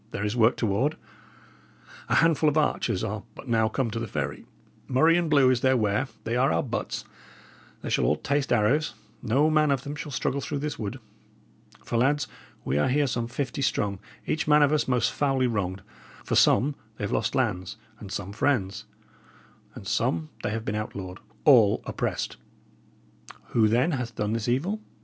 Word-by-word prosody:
"There 100 Hz, -, -3 dB
is 105 Hz, +2 st, -1 dB
work 115 Hz, 0 st, +4 dB
toward. 120 Hz, +8 st, 0 dB, 1.1 s
A -, -, +2 dB
handful 160 Hz, -2 st, +4 dB
of 150 Hz, -, -1 dB
archers 150 Hz, -, +1 dB
are -, -, -3 dB
but -, -, -11 dB
now 110 Hz, -2 st, +2 dB
come 125 Hz, -2 st, -1 dB
to 115 Hz, -, -3 dB
the 115 Hz, -, -4 dB
ferry; -, -, -4 dB, 0.4 s
murrey 160 Hz, +6 st, +4 dB
and 170 Hz, -2 st, +1 dB
blue 140 Hz, -4 st, +5 dB
is 125 Hz, -2 st, +1 dB
their 130 Hz, 0 st, +3 dB
wear; 105 Hz, +4 st, +1 dB, 0.2 s
they 115 Hz, +1 st, -2 dB
are 130 Hz, +2 st, +3 dB
our -, -, +1 dB
butts 120 Hz, -3 st, -4 dB, 0.8 s
they -, -, -4 dB
shall -, -, +2 dB
all 75 Hz, -, +3 dB
taste 140 Hz, -, -1 dB
arrows 120 Hz, +7 st, +2 dB, 0.3 s
no 135 Hz, +7 st, +2 dB
man 155 Hz, -1 st, +3 dB
of 135 Hz, -2 st, +1 dB
them 145 Hz, +1 st, -5 dB
shall 150 Hz, 0 st, -6 dB
struggle 140 Hz, +1 st, -1 dB
through 145 Hz, -, -3 dB
this 145 Hz, 0 st, -4 dB
wood. 110 Hz, +4 st, -4 dB, 0.9 s
For, 115 Hz, -, -1 dB
lads, 145 Hz, +4 st, +2 dB, 0.4 s
we 70 Hz, +2 st, +1 dB
are -, -, +2 dB
here 145 Hz, +3 st, +2 dB
some 120 Hz, -3 st, -2 dB
fifty 130 Hz, +2 st, -3 dB
strong, 100 Hz, -7 st, 0 dB, 0.3 s
each 155 Hz, -, -1 dB
man 150 Hz, 0 st, +6 dB
of 145 Hz, +1 st, +3 dB
us 150 Hz, -, +1 dB
most 125 Hz, -2 st, +2 dB
foully 135 Hz, -3 st, +1 dB
wronged; 95 Hz, -5 st, -2 dB, 0.4 s
for -, -, -4 dB
some 145 Hz, +4 st, +4 dB, 0.2 s
they -, -, -6 dB
have 100 Hz, -, -2 dB
lost -, -, 0 dB
lands, 90 Hz, +3 st, -1 dB, 0.2 s
and 100 Hz, -3 st, -9 dB
some 100 Hz, -1 st, -5 dB
friends; 105 Hz, -4 st, 0 dB, 0.9 s
and -, -, -9 dB
some 80 Hz, -2 st, 0 dB
they -, -, -2 dB
have 110 Hz, +1 st, -4 dB
been 105 Hz, -, -2 dB
outlawed 100 Hz, -3 st, -5 dB, 0.3 s
all 115 Hz, -9 st, +6 dB
oppressed! -, -, -3 dB, 1.1 s
Who, 110 Hz, -2 st, +3 dB
then, 125 Hz, +10 st, +2 dB
hath 125 Hz, -5 st, -3 dB
done 105 Hz, +1 st, -1 dB
this 115 Hz, -2 st, -2 dB
evil? 180 Hz, -, 0 dB
125 Hz, 185 wpm, -26 LUFS, 105-145 Hz, 1.1 s, man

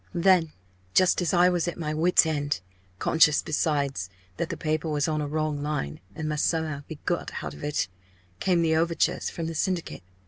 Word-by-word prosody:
"Then 175 Hz, -2 st, +4 dB, 0.4 s
just 185 Hz, 0 st, +4 dB
as 175 Hz, -, +1 dB
I 180 Hz, 0 st, +5 dB
was 175 Hz, -1 st, 0 dB
at 175 Hz, -, -3 dB
my 155 Hz, -3 st, -2 dB
wit's 170 Hz, +3 st, +4 dB
end, 145 Hz, -, -1 dB, 0.4 s
conscious 155 Hz, +3 st, +4 dB
besides 140 Hz, -, 0 dB, 0.3 s
that -, -, -2 dB
the -, -, -4 dB
paper 155 Hz, 0 st, -1 dB
was 150 Hz, -2 st, 0 dB
on 155 Hz, -1 st, 0 dB
a 145 Hz, -, -2 dB
wrong 155 Hz, -1 st, -1 dB
line, 145 Hz, -, -3 dB, 0.2 s
and 155 Hz, -, -4 dB
must 150 Hz, -1 st, +1 dB
somehow 160 Hz, -3 st, -1 dB
be 160 Hz, -, -7 dB
got 175 Hz, -, -2 dB
out -, -, -5 dB
of -, -, -11 dB
it 145 Hz, -6 st, 0 dB, 0.5 s
came 175 Hz, -3 st, +2 dB
the 160 Hz, -1 st, +2 dB
overtures 170 Hz, +1 st, +1 dB
from 165 Hz, -, -5 dB
the 165 Hz, -, -3 dB
Syndicate. 170 Hz, -, -2 dB
155 Hz, 195 wpm, -26 LUFS, 150-170 Hz, 0.5 s, I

